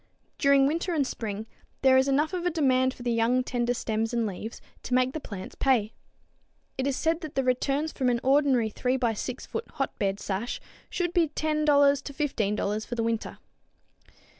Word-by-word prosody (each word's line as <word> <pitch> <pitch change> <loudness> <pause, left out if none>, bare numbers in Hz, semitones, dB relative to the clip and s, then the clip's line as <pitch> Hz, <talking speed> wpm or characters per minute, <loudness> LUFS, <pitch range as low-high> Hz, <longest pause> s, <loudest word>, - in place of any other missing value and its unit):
During 280 -1 +5
winter 335 +4 0
and 285 -3 +2
spring 215 -4 -4 0.4
there 265 -1 +6
is 260 +1 +4
enough 295 +5 +1
of 360 -2 -2
a 355 - +2
demand 260 -5 +2
for 250 - -11
the 240 - 0
young 235 +2 +2
tender 245 -1 -1
stems 225 0 -2
and 235 -1 +1
leaves 210 +3 -6 0.2
to 250 - -1
make 255 +1 +2
the 315 - -3
plants 200 -9 -8
pay. 235 -6 +1 0.8
It 265 +1 -1
is 275 - 0
said 325 +3 0
that 315 -3 -7
the 270 - +1
returns 275 +4 0
from 255 -3 0
an 240 -1 +1
ordinary 265 -5 +3
3 250 +4 0
x 230 -4 0
6 250 0 -5
foot 460 - -5
hotbed 200 -7 -2
sash 205 +5 -3 0.3
should 350 -1 -2
be 340 -3 +3
$10 305 0 -1 0.4
to 280 - -8
$15 215 -7 -1
for 240 - -4
the 230 - -1
winter. 230 -1 -2
255 Hz, 190 wpm, -27 LUFS, 230-285 Hz, 0.8 s, there